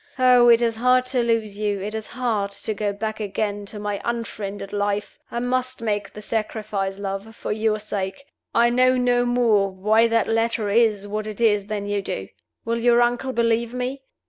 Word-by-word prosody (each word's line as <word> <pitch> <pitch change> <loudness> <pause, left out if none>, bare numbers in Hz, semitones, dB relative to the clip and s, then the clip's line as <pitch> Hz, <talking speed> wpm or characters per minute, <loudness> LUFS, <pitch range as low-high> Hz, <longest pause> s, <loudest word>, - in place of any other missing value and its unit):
Oh, 250 -2 +6
it 235 0 +6
is 230 -1 0
hard 250 +2 +3
to 250 - +3
lose 225 -3 -1
you! 205 -2 0
it 205 +3 -4
is 220 -1 -4
hard 230 -5 -1
to 210 +2 -3
go 205 0 -1
back 215 +2 -4
again 205 0 -3
to 210 - -8
my 205 -1 -3
unfriended 210 -4 -4
life! 205 0 -2
I - - -5
must 255 +1 -1
make 205 -3 -2
the 210 - -10
sacrifice, 215 -3 -2
love, 200 +2 -5
for - - -5
your 215 0 +1
sake. 205 +3 -4 0.3
I 235 +1 +4
know 255 +1 +4
no 245 -1 +2
more 230 -5 +3
why 210 +4 +3
that 230 -1 +2
letter 225 -2 0
is 215 -2 +2
what 210 +1 -3
it 215 0 -7
is 210 -3 +2
than 210 -2 -3
you 205 0 -1
do. 95 - -5 0.4
Will 230 +1 -1
your 240 0 +4
uncle 245 +2 0
believe 235 0 0
me? 255 +2 -3
220 Hz, 195 wpm, -23 LUFS, 205-235 Hz, 0.4 s, Oh